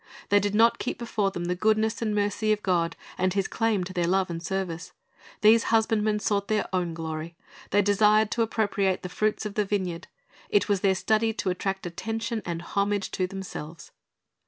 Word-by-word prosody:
They 205 - +5
did 205 +1 -1
not 230 +2 +4
keep - - -3
before 225 -4 -1
them 175 -3 -5
the 180 - 0
goodness 220 +4 +1
and 215 -2 0
mercy 205 +1 +1
of 210 -1 0
God 170 -3 +1 0.2
and 185 0 +1
His 195 -1 +1
claim 225 -4 0
to 185 +1 -7
their 175 -2 0
love 190 0 +1
and 165 0 -4
service. 180 -1 -4 0.5
These 220 +2 +6
husbandmen 220 -1 +2
sought 200 -1 0
their 215 0 0
own 175 -3 -1
glory. 160 0 -5 0.3
They 205 0 +3
desired 210 +1 +4
to 235 - 0
appropriate 205 -4 0
the 180 - -4
fruits 215 +3 -1
of 210 - -4
the 210 - +1
vineyard. 185 -4 -2 0.4
It 205 - +2
was 200 -3 +1
their 190 -1 +3
study 220 +3 +1
to 195 -3 -1
attract 190 +1 -3
attention 225 +5 -3
and 170 0 -3
homage 200 +1 -1
to 185 - -1
themselves. 180 -4 -8
200 Hz, 190 wpm, -26 LUFS, 180-215 Hz, 0.5 s, These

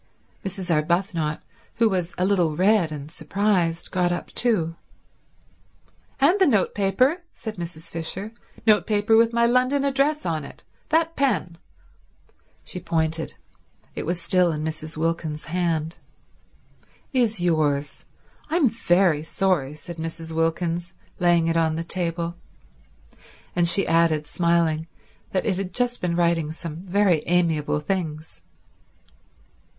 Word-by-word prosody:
Mrs. 190 -2 -4
Arbuthnot, 160 -1 0 0.3
who 230 0 +4
was 185 -4 -2
a 180 - +1
little 180 -6 +2
red 190 -2 +3
and 150 0 -7
surprised, 170 0 0
got 180 -2 +1
up 175 - -4
too. 175 -9 +1 1.4
"And 325 +9 +4
the 380 - +5
notepaper," 215 - +2
said 220 -4 -7
Mrs. 170 -2 -7
Fisher. 180 +6 -4 0.3
"Notepaper 215 0 +3
with 230 +1 +5
my 235 0 +3
London 255 +4 +2
address 280 +2 +1
on 160 -3 -1
it. 140 - -11 0.3
That 330 +1 +2
pen—" 205 -11 0 1.0
She 180 - -6
pointed. 160 -2 -1 0.6
It - - -5
was 175 0 -1
still 175 +1 +3
in 155 -1 -3
Mrs. 155 0 -5
Wilkins's 160 -1 -2
hand. 165 -2 -1 1.1
"Is 235 -6 +2
yours. 155 -5 0 0.4
I'm 315 -5 +3
very 175 -7 +2
sorry," 160 -4 0
said 170 +3 -9
Mrs. 165 0 -6
Wilkins, 165 +2 -1 0.3
laying 175 -2 +4
it 165 0 +1
on 160 -1 +2
the 165 - -2
table. 170 -1 -2 1.2
And 175 -1 +3
she 195 +3 +3
added 165 -2 +2
smiling, 170 -1 +1 0.4
that 185 - 0
it 190 -4 +1
had 190 -2 -4
just 245 -1 -1
been 175 -1 0
writing 170 -3 +1
some 160 -1 -7
very 185 -2 +2
amiable 165 -4 +1
things. 155 - -4
175 Hz, 125 wpm, -24 LUFS, 160-200 Hz, 1.4 s, the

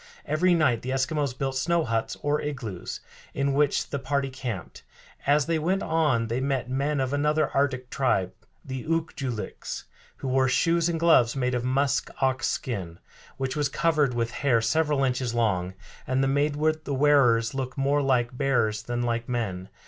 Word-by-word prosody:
Every 175 +4 +3
night 130 -9 +2
the 130 - -5
Eskimos 135 0 -1
built 135 -1 -2
snow 170 +5 +1
huts, 115 -3 -2
or 145 +1 +1
igloos, 120 -11 -5 0.3
in 140 0 +1
which 145 0 +1
the 140 - -2
party 135 0 -1
camped. 120 -9 -6 0.5
As 145 0 +4
they 165 -1 0
went 185 +5 0
on 150 -8 +1
they 115 +3 -2
met 135 -2 -1
men 140 +3 -1
of 130 +1 -1
another 150 +1 +1
Arctic 130 -3 0
tribe, 95 -9 +1 0.3
the 130 -2 -5
Ook 165 0 -1
joo 135 -2 -3
liks, 110 -3 -5 0.3
who 135 - -5
wore 130 0 +2
shoes 165 +5 +2
and 165 -1 -1
gloves 140 -8 +4
made 125 -2 0
of 120 -1 -1
musk 135 +2 +1
ox 130 -1 +1
skin, 95 -9 -3 0.4
which 135 +1 -2
was 145 -2 0
covered 150 -4 +1
with 115 0 -1
hair 125 -2 +2
several 145 +4 +1
inches 125 -2 0
long, 95 -6 0 0.3
and 135 +1 +1
made 145 +1 +1
the 155 -1 0
wearers 125 -5 +4
look 130 -1 -4
more 140 +2 +2
like 125 -3 +1
bears 120 -6 +1
than 120 +2 -3
like 120 0 -2
men. 100 -7 -3
135 Hz, 175 wpm, -26 LUFS, 120-145 Hz, 0.5 s, As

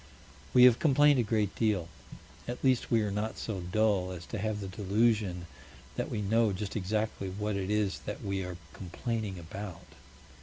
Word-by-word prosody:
We 125 - +7
have 125 -2 +7
complained 145 -2 +5
a - - +3
great 105 -2 0
deal. 105 -7 +1 0.6
At 120 +1 -5
least 130 -2 +2
we 115 -2 +3
are 105 - -1
not 105 +2 -2
so 105 -4 -4
dull 95 0 +1
as 90 -2 -7
to 110 - -1
have 110 +1 -1
the 100 - -5
delusion 100 -2 +1 0.5
that - - -2
we 105 - -2
know 110 +1 +2
just 100 +1 -4
exactly 105 -1 -1
what 105 +2 -2
it 95 -1 -2
is 105 -2 0
that - - -5
we 100 -1 -1
are 90 -1 -6 0.2
complaining 100 +2 -4
about. 90 +1 -8
105 Hz, 180 wpm, -30 LUFS, 95-110 Hz, 0.6 s, We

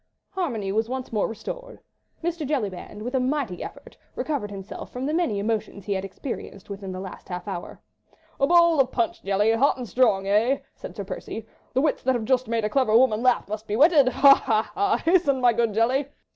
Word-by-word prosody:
Harmony 240 - -2
was 220 +3 0
once 260 -2 -5
more 210 - +1
restored. - - -7 0.4
Mr. 340 -1 -2
Jellyband, 210 -7 -3
with 245 +3 -4
a 260 - +2
mighty 255 -8 -1
effort, - - -10 0.2
recovered 280 -9 -2
himself 195 0 -8
from 250 +1 -4
the 300 - -1
many 325 -11 +1
emotions 205 -2 -3
he 205 - -1
had 190 -1 -2
experienced 200 -1 -7
within 195 -1 -6
the 185 - -6
last 190 0 -9
half 180 0 -5
hour. 185 -3 -6 0.6
"A 275 - +3
bowl 340 -2 +5
of 265 - +3
punch, 235 -2 -1
Jelly, 200 +3 +2
hot 260 +6 +3
and 250 -2 -6
strong, 210 -3 +2
eh?" 220 +7 +3 0.2
said - - -10
Sir - - -4
Percy. - - -6 0.3
"The 260 - +3
wits 300 0 +1
that 260 0 +1
have 230 -2 -2
just 255 +1 +1
made 225 -1 0
a - - +2
clever 230 -2 +3
woman 235 -3 +3
laugh 250 -4 +2
must 215 +1 -6
be 210 - -1
whetted! 290 +1 +6
Ha! 275 +1 +7
ha! 220 -5 0
ha! 400 0 +2
Hasten, 330 -6 +3
my 245 -2 +4
good 230 -1 +1
Jelly!" 250 +6 +1
235 Hz, 210 wpm, -25 LUFS, 205-275 Hz, 0.6 s, Ha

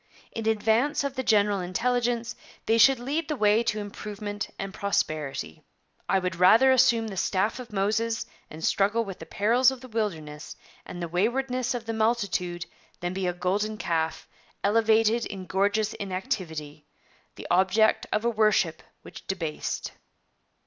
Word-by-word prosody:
In 225 -1 -4
advance 225 +7 +2
of 280 -1 -2
the 260 - -2
general 205 -4 +3
intelligence, 235 +5 -1 0.3
they 225 +1 +2
should 270 +3 +7
lead 285 +6 -2
the 305 - -1
way 210 -2 +3
to 225 -2 -1
improvement 205 0 -5
and 195 0 -5
prosperity. 155 - -2 0.5
I 195 - +4
would 185 -2 -2
rather 220 +9 +6
assume 235 -3 +4
the 195 - -7
staff 195 +6 0
of 245 -2 -9
Moses 220 +3 0 0.2
and 160 +1 -6
struggle 205 +4 +2
with 195 -2 -8
the - - -9
perils 240 +5 +3
of 265 -1 -6
the 255 - -10
wilderness 160 -10 -4 0.3
and 175 - -6
the - - -2
waywardness 250 +8 0
of 235 -2 -5
the 225 - -3
multitude 200 -6 0 0.3
than 175 +1 -3
be 190 -1 -2
a 180 - 0
golden 200 +5 -1
calf, 160 -5 -2 0.4
elevated 225 +2 +3
in 190 -2 -7
gorgeous 205 +4 +1
inactivity 185 - -5 0.5
the - - -10
object 190 +5 +3
of 215 +2 0
a - - +4
worship 215 -7 +2 0.2
which - - -12
debased.' 170 -5 -3
210 Hz, 155 wpm, -26 LUFS, 185-230 Hz, 0.5 s, should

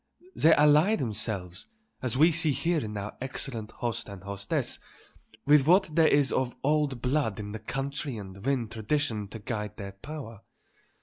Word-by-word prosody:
They 160 +1 +6
ally 150 +8 +5
themselves, 105 - -4 0.3
as 125 -1 -1
we 160 +4 +6
see 160 -2 +1
here 170 +3 +1
in 105 -1 -5
our 100 +1 -5
excellent 125 -4 -5
host 120 -3 -3
and 100 -2 -9
hostess, 100 0 -3 0.7
with 145 -1 +5
what 185 0 +5
there 160 0 +5
is 140 -2 +3
of 130 -2 0
old 145 -4 +1
blood 125 -6 0
in 105 -1 -5
the 110 - -5
country 135 +3 -4
and 95 -1 -9
win 130 -3 0
tradition 110 -1 -1
to 115 - -8
guide 105 -1 -4
their 100 -2 -6
power. 115 +1 -9
125 Hz, 165 wpm, -28 LUFS, 105-150 Hz, 0.7 s, They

